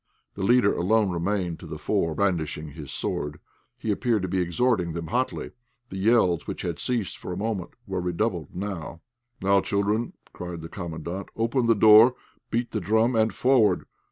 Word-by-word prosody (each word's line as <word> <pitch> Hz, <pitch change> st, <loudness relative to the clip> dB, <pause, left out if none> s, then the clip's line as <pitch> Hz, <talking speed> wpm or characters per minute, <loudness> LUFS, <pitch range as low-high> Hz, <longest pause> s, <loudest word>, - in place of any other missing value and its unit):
The 100 Hz, -, -7 dB
leader 105 Hz, +1 st, +4 dB
alone 100 Hz, +2 st, +2 dB
remained 90 Hz, 0 st, -1 dB
to -, -, -10 dB
the -, -, -6 dB
fore, 80 Hz, -2 st, 0 dB
brandishing 80 Hz, -5 st, -1 dB
his 75 Hz, -3 st, -9 dB
sword; 75 Hz, +1 st, -3 dB, 0.4 s
he 110 Hz, -, -2 dB
appeared 110 Hz, -1 st, +1 dB
to -, -, -1 dB
be 95 Hz, +1 st, -1 dB
exhorting 90 Hz, 0 st, +1 dB
them 85 Hz, 0 st, -4 dB
hotly. 125 Hz, +2 st, -1 dB, 0.4 s
The 95 Hz, -, -5 dB
yells 100 Hz, -5 st, +3 dB
which -, -, -5 dB
had 85 Hz, -4 st, -3 dB
ceased 115 Hz, -, -2 dB
for -, -, -6 dB
a 90 Hz, -, -4 dB
moment 100 Hz, -3 st, -3 dB
were 95 Hz, -3 st, -3 dB
redoubled 90 Hz, -2 st, -1 dB
anew. 90 Hz, -4 st, -5 dB, 0.4 s
"Now, 100 Hz, 0 st, +4 dB
children," 105 Hz, +4 st, 0 dB, 0.2 s
cried 90 Hz, -2 st, -6 dB
the 80 Hz, -, -8 dB
Commandant, 85 Hz, +1 st, -6 dB
"open 115 Hz, +2 st, +1 dB
the 115 Hz, -, +5 dB
door, 110 Hz, +4 st, +7 dB, 0.3 s
beat 120 Hz, +1 st, -1 dB
the 110 Hz, -, -2 dB
drum, 110 Hz, +6 st, +2 dB
and 110 Hz, 0 st, +3 dB
forward! 125 Hz, -5 st, +3 dB
100 Hz, 175 wpm, -26 LUFS, 85-110 Hz, 0.4 s, door